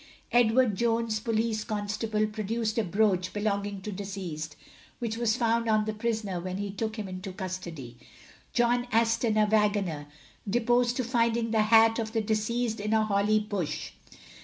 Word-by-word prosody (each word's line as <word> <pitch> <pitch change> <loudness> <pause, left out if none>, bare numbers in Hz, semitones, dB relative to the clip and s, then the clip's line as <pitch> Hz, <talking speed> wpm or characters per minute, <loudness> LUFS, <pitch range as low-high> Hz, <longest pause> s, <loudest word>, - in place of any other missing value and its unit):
Edward 240 -1 +4
Jones, 230 +1 0
police 220 -1 -1
constable, 215 0 -1
produced 215 +1 -2
a - - +2
brooch 185 -1 +1
belonging 205 -1 -2
to 210 - -5
deceased, 185 -6 -5 0.4
which 230 -2 -3
was 230 -1 +1
found 230 -1 +1
on 215 -1 +3
the 215 - -2
prisoner 215 -4 -2
when 185 +1 -4
he 200 0 -3
took 220 +2 -3
him 210 -2 -4
into 185 +1 -6
custody. 175 -10 -6 0.5
John 245 +1 +2
Aston, 230 0 +2
a 215 - +5
waggoner, 205 -8 +1 0.4
deposed 240 +2 +2
to 255 - 0
finding 230 -1 +1
the 220 -1 +3
hat 225 +1 +5
of 220 -1 -3
the 225 - +1
deceased 220 +2 -1
in 210 +1 -1
a 220 -1 +3
holly 210 +1 +2
bush. 205 -6 -3
215 Hz, 160 wpm, -28 LUFS, 200-230 Hz, 0.5 s, a